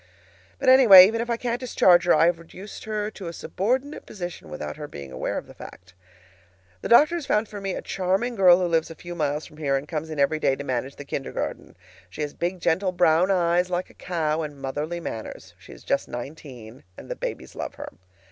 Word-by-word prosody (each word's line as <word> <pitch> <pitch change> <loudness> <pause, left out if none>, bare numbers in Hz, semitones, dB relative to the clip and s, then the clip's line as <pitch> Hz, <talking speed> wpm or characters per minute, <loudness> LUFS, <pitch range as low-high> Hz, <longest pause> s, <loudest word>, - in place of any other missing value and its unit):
But, - - -4
anyway, 235 -8 +10
even 225 +3 0
if 240 - -5
I 235 - 0
can't 240 0 -2
discharge 185 -8 +4
her, 175 - +5
I 160 - +4
have 170 0 +2
reduced 185 +5 -11
her 215 -1 -3
to 190 -5 -9
a 170 - -6
subordinate 255 - -2
position 175 - -7
without 75 0 -6
her - - -7
being 70 -2 -10
aware 65 - -3
of - - -5
the - - -14
fact. 90 0 -13 0.9
The - - -5
doctor 295 +8 +6
has 335 -5 -4
found 210 +1 +1
for 205 -1 -8
me 195 -1 -3
a - - -6
charming 195 +6 -1
girl 185 -5 +6
who 180 - 0
lives 165 -2 0
a 165 - -9
few 175 +2 -9
miles 150 -2 -2
from 150 - -15
here 140 -3 0
and 140 +2 -6
comes 160 0 -4
in 155 - -6
every 145 +3 +2
day 135 - +2
to 140 - -7
manage 130 0 -3
the 145 - -10
kindergarten. 135 -1 -5 0.3
She 100 +11 -5
has 145 - -5
big, 180 +2 -3
gentle, 185 +3 +1
brown 175 0 +3
eyes, 180 -1 +2
like 180 0 -3
a - - -21
cow's, 160 -3 -2
and 145 -2 -10
motherly 145 +5 -4
manners 115 -9 -7
(she - - -15
is - - -13
just - - -1
nineteen), 125 -2 -9
and - - -11
the - - -4
babies - - -6
love - - -6
her. - - -7
170 Hz, 225 wpm, -24 LUFS, 145-195 Hz, 0.9 s, anyway